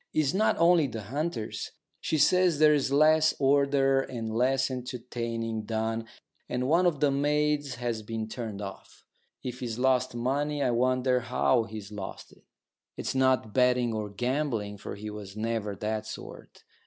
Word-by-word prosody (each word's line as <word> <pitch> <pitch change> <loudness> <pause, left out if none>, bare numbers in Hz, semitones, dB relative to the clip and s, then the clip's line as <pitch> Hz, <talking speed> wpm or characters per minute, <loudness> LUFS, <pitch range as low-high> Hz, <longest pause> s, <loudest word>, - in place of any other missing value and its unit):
It's 150 -3 +2
not 215 +3 +2
only 170 -2 +5
the 115 -4 -6
hunters. 130 - -4 0.3
She 160 - -1
says 180 +1 +4
there's 150 -3 +4
less 155 +2 +4
ordered 135 -1 +3
and 115 -3 -4
less 130 +2 +2
entertaining 115 -3 -4
done, 110 +1 -2 0.4
and 125 +1 -1
one 170 +5 +4
of 150 -5 -1
the 145 -2 +4
maids 145 0 +1
has 120 -2 -3
been 110 0 -4
turned 110 -3 -5
off. 95 - -10 0.4
If 125 0 -5
he's 120 -4 -4
lost 130 -1 +2
money, 140 +4 -1
I 125 - +2
wonder 125 +1 +2
how 120 -1 +1
he's 110 -2 -8
lost 100 -2 -7
it. - - -20 0.6
It's - - -3
not 130 -5 +2
betting 125 -2 +3
or 105 -1 -3
gambling, 115 -2 -2
for - - -6
he 105 +1 -7
was 105 -1 -9
never 110 -2 -2
that 110 +2 -3
sort. - - -10
125 Hz, 155 wpm, -28 LUFS, 110-140 Hz, 0.6 s, only